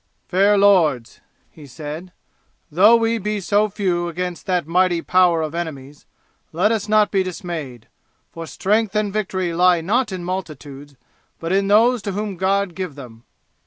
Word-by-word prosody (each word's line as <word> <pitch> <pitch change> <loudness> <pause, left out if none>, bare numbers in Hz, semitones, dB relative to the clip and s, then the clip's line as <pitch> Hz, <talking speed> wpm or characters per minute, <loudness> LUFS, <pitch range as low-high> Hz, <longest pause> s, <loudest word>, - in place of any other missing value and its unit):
"Fair 200 +3 +3
lords," 165 - +2 0.3
he 150 -3 -14
said, 155 +6 -8 0.6
"though 200 +9 +6
we 230 0 +1
be 210 +1 -3
so 205 +3 +1
few 180 -4 -1
against 180 +2 -5
that 180 -4 0
mighty 175 +1 +1
power 175 -1 +2
of 155 0 -5
enemies, 150 -4 -7 0.4
let 185 +7 +1
us 215 -2 -2
not 215 -1 +3
be 195 - +2
dismayed, 170 - -6 0.4
for 165 -1 -8
strength 210 +3 -1
and 210 -2 0
victory 185 -4 -2
lie 180 0 +3
not 215 +7 0
in 185 -2 -5
multitudes, 145 -6 -7 0.4
but 165 +1 -4
in 195 +1 +1
those 230 +4 +4
to 200 -1 -4
whom 205 0 -4
God 195 +1 0
give 180 -5 -6
them. 120 -5 -12
185 Hz, 160 wpm, -20 LUFS, 165-205 Hz, 0.6 s, though